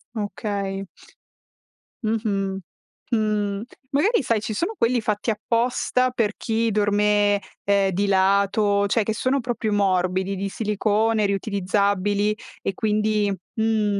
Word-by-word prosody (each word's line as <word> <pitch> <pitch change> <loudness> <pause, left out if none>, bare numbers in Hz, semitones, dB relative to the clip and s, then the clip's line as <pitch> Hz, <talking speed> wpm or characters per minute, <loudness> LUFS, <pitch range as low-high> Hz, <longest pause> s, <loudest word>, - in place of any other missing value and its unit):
Okay. 200 -1 -3 1.2
Mh-mh, 205 -3 -1 0.6
mh, 210 -2 0 0.3
magari 375 - +3
sai, 230 -3 +1
ci 215 - -3
sono 345 - -1
quelli 240 +1 +2
fatti 215 0 -1
apposta 245 +3 +1
per 225 -4 0
chi 225 0 0
dorme, 205 -1 +2 0.2
ehm, 200 -1 +2
di 200 +3 0
lato, 200 +1 +3
cioè 220 +1 +2
che 220 - -1
sono 260 +5 0
proprio 235 -3 -2
morbidi, 190 -1 +1
di 195 +1 -3
silicone 215 +1 +1
riutilizzabili 200 +1 0 0.3
e 195 - -2
quindi 210 0 +1 0.2
mh. 220 -2 +1
210 Hz, 115 wpm, -23 LUFS, 200-220 Hz, 1.2 s, magari